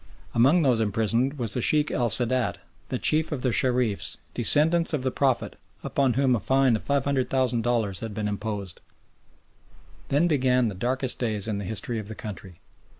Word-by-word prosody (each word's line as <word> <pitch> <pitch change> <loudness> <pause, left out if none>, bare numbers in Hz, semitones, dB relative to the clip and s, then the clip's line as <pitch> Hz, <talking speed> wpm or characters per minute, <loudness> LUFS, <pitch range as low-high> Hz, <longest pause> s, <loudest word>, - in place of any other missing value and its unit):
Among 140 +9 +4
those 125 -5 +3
imprisoned 115 +6 0
was 115 -5 -2
the 125 - -1
Sheikh 150 +4 +2
el 120 -1 0
Sadat, 120 -3 +1 0.3
the 130 - -1
Chief 155 +5 +1
of 140 -4 -4
the 125 - +1
Shereefs, 125 -4 0
or - - -27
descendants 165 +3 +2
of 145 -4 -1
the 130 - 0
Prophet, 130 -2 0 0.3
upon 135 -3 +1
whom 130 0 +2
a - - -1
fine 130 +3 +2
of 110 - -3
500,000 130 -3 0
dollars 110 -6 0
had 110 -2 -6
been 105 -1 -2
imposed. 100 -3 -5 1.3
Then 150 +5 +3
began 125 -6 +2
the - - -6
darkest 125 +6 -1
days 110 -4 -2
in 105 -2 -2
the 100 - -5
history 110 +3 -3
of 105 - -7
the 110 - -6
country. 95 -5 -9
125 Hz, 180 wpm, -25 LUFS, 110-135 Hz, 1.3 s, Among